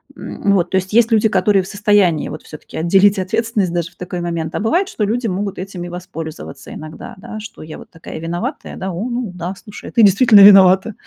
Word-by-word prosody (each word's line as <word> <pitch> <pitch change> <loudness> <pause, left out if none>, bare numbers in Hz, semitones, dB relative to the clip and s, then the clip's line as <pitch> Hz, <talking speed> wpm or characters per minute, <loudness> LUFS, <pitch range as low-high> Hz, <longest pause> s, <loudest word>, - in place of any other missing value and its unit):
М, 200 - -2
вот. 180 -3 +1
То 190 - 0
есть 190 +2 -3
есть 230 0 +4
люди, 220 0 +3
которые 195 -1 +2
в - - -11
состоянии, 200 -6 +1
вот, - - -8
всё-таки 155 - -11
отделить 195 +5 +3
ответственность 195 -1 -1
даже 170 0 -3
в - - -28
такой 180 0 -6
момент. 170 -1 -4
А - - -1
бывает, 345 - 0
что 220 - -4
люди 230 +3 -1
могут 195 +1 -3
этим 185 -1 -7
и 175 - -7
воспользоваться 165 -5 -9
иногда, 155 0 -10
да. 215 +2 -9
Что 215 -6 -11
я 155 - -9
вот - - -14
такая 165 -1 -10
виноватая. 170 +2 -5
"О, 190 +5 -4
ну 240 -5 -4
да, 180 +2 -6
слушай, 205 +1 -11
а - - -13
ты 230 - +3
действительно 205 +1 +6
виновата". 195 +1 +6
190 Hz, 215 wpm, -17 LUFS, 175-210 Hz, -, действительно